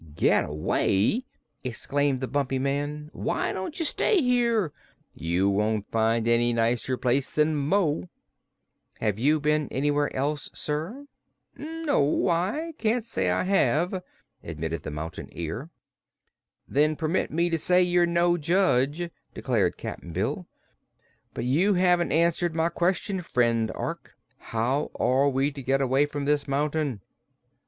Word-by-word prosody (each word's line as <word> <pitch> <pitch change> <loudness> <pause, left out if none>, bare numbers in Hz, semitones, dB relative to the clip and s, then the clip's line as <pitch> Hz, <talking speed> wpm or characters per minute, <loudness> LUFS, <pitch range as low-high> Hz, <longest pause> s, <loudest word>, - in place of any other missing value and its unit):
"Get - - +2
away!" 95 - +1 0.4
exclaimed 135 +2 -1
the 130 - -2
Bumpy 135 +1 -1
Man. 145 +3 -2
"Why - - -1
don't 190 - -5
you 330 - -1
stay 400 +6 +2
here? 235 - +2 0.4
You 85 +4 0
won't 105 +1 0
find 115 0 +1
any 120 0 +3
nicer 115 +2 0
place 130 +2 +1
than 155 +1 +1
Mo." 145 - 0 0.9
"Have 105 -2 -1
you 150 +5 +3
been 150 0 +1
anywhere 145 +2 0
else, 145 +3 -2
sir?" 165 - -4 0.5
"No; 300 - 0
I 205 - -1
can't 225 +1 +1
say 230 - -2
that - - +1
I - - -1
have," 185 -1 +1 0.4
admitted 80 -1 -4
the - - -6
Mountain 80 +4 -6
Ear. 95 - -5 1.0
"Then 150 +2 +2
permit 160 +4 -1
me 170 +2 0
to 165 - +1
say 180 +3 +4
you're 175 -1 +3
no 175 0 +2
judge," 165 -2 +1 0.3
declared - - 0
Cap'n 85 - -7
Bill. 140 - -2 0.9
"But 120 - -3
you 175 +11 +3
haven't 180 -1 +3
answered 170 +1 +2
my 165 +1 +2
question, 185 +2 0
friend 115 -7 +1
Ork. - - -5 0.2
How 125 +6 -1
are 135 +3 +3
we 135 +2 +1
to 140 -1 -8
get 135 +2 +1
away 135 +2 +2
from 145 -1 -4
this 145 0 +1
mountain?" 145 -4 -1
145 Hz, 140 wpm, -26 LUFS, 125-175 Hz, 1.0 s, say